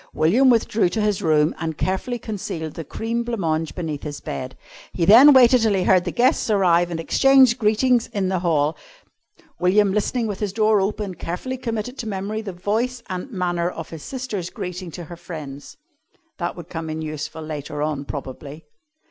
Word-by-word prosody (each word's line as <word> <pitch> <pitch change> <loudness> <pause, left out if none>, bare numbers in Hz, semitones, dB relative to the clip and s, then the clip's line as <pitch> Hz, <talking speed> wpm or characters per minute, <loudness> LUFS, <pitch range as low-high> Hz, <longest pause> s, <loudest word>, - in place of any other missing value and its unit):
William 235 +12 +4
withdrew 225 -5 +2
to 220 - -3
his 210 -1 0
room 155 -3 +3
and 160 -2 -3
carefully 190 +7 -2
concealed 185 -8 -5
the 165 - -6
cream 230 +9 -3
blanc 235 0 -3
mange 160 -2 -1
beneath 155 -5 -4
his 145 -1 -6
bed. 130 -2 -6 0.4
He 170 - 0
then 245 - +9
waited 255 -2 +6
till 220 -3 +2
he 185 - +1
heard 180 -1 +4
the - - -2
guests 255 +1 +2
arrive 175 -4 +3
and 170 -1 -4
exchange 260 +6 +4
greetings 235 +2 +2
in 195 -2 -2
the 185 -1 0
hall. 160 -3 +1 0.8
William, 195 +2 +3
listening 225 +3 0
with 205 -3 -4
his 205 -3 -2
door 215 -1 +3
open, 200 0 -2
carefully 180 +10 -5
committed 245 +1 -4
to 225 - -4
memory 205 +2 -3
the 210 -3 -6
voice 225 +7 -2
and 185 +8 -4
manner 175 -5 -1
of 165 -2 -8
his 160 -2 -8
sister's 225 - -5
greeting 180 0 -6
to 175 +2 -8
her 170 +2 -9
friends. 155 - -9 0.6
That 175 -1 -2
would 175 -2 -9
come 165 -2 -5
in 160 0 -4
useful 155 +1 -5
later 150 -1 -5
on, 150 -2 -2
probably. 140 +2 -8
185 Hz, 185 wpm, -22 LUFS, 160-225 Hz, 0.8 s, then